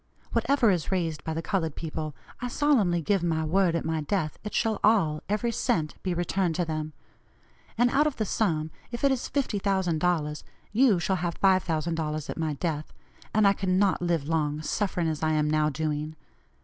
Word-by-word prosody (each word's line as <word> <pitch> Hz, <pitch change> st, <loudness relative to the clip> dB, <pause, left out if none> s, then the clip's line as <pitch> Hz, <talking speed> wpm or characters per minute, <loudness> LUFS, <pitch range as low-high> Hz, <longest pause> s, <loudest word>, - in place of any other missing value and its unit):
Whatever 275 Hz, -6 st, +3 dB
is 175 Hz, -1 st, -1 dB
raised 165 Hz, -5 st, -1 dB
by 160 Hz, -, -3 dB
the 165 Hz, -, -3 dB
colored 165 Hz, -6 st, -1 dB
people, 155 Hz, -2 st, -5 dB, 0.3 s
I 250 Hz, -, -1 dB
solemnly 230 Hz, -, +2 dB
give 195 Hz, +2 st, +2 dB
my 160 Hz, -2 st, 0 dB
word, 175 Hz, +2 st, +2 dB
at 165 Hz, -, -2 dB
my 160 Hz, -1 st, -1 dB
death 155 Hz, 0 st, -2 dB
it 210 Hz, -, -5 dB
shall 225 Hz, -2 st, +1 dB
all, 180 Hz, -9 st, +3 dB
every 215 Hz, +3 st, 0 dB
cent, 155 Hz, -8 st, 0 dB
be 185 Hz, -2 st, -1 dB
returned 175 Hz, 0 st, 0 dB
to 175 Hz, -, 0 dB
them. 155 Hz, -1 st, -4 dB, 0.8 s
And 245 Hz, +1 st, +3 dB
out 295 Hz, +2 st, +3 dB
of 295 Hz, -, -2 dB
the 215 Hz, -, -1 dB
sum, 160 Hz, -7 st, 0 dB, 0.2 s
if 235 Hz, +2 st, -5 dB
it 280 Hz, -, +5 dB
is 260 Hz, -2 st, -2 dB
$50,000, 180 Hz, -, 0 dB, 0.3 s
you 220 Hz, -4 st, +4 dB
shall 190 Hz, +2 st, 0 dB
have 175 Hz, -1 st, -3 dB
$5,000 165 Hz, -4 st, +1 dB
at -, -, -7 dB
my 160 Hz, -2 st, 0 dB
death; 155 Hz, 0 st, -3 dB, 0.4 s
and 215 Hz, -2 st, +4 dB
I 200 Hz, -, +5 dB
cannot 190 Hz, 0 st, +1 dB
live 170 Hz, -5 st, 0 dB
long, 155 Hz, -2 st, 0 dB
suffering 180 Hz, -1 st, -1 dB
as 155 Hz, -1 st, -2 dB
I 155 Hz, 0 st, +1 dB
am 150 Hz, -1 st, +2 dB
now 155 Hz, 0 st, +2 dB
doing. 155 Hz, +1 st, -3 dB
170 Hz, 185 wpm, -27 LUFS, 155-200 Hz, 0.8 s, it